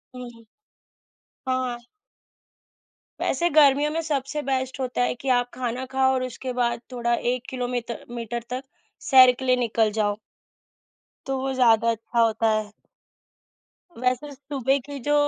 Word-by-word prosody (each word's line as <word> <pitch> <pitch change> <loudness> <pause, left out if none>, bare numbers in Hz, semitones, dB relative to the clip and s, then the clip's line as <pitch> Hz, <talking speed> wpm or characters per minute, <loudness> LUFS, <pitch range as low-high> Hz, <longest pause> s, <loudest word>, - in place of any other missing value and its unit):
हुँ। 240 -2 -10 1.0
हाँ। 255 -2 -1 1.4
वैसे 345 0 +1
गर्मियों 290 0 +5
में 325 - -1
सबसे 295 -1 -2
बेस्ट 260 0 -1
होता 250 -1 -2
है 245 - 0
कि 270 - -3
आप 245 0 -3
खाना 250 +1 -3
खाओ 265 0 +3
और 255 -1 0
उसके 255 +1 -5
बाद 235 -1 0
थोड़ा 240 -1 -1 0.2
1 250 -1 -5
किलो 250 -1 -3
मीतर 240 -2 -4
मीटर 235 0 -4
तक 255 +2 -4 0.5
सैर 255 -2 +9
के 260 - -5
लिए 255 - +4
निकल 225 -3 +1
जाओ। 205 0 0 1.1
तो 270 0 -2
वो 265 0 -2
ज़्यादा 230 -2 +4
अच्छा 230 +1 -3
होता 225 0 +2
है। 215 -1 -1 1.3
वैसे 255 +4 -1
सुबह 275 -1 -1
की 285 -1 -7
जो 295 - +3
250 Hz, 145 wpm, -24 LUFS, 235-265 Hz, 1.4 s, सैर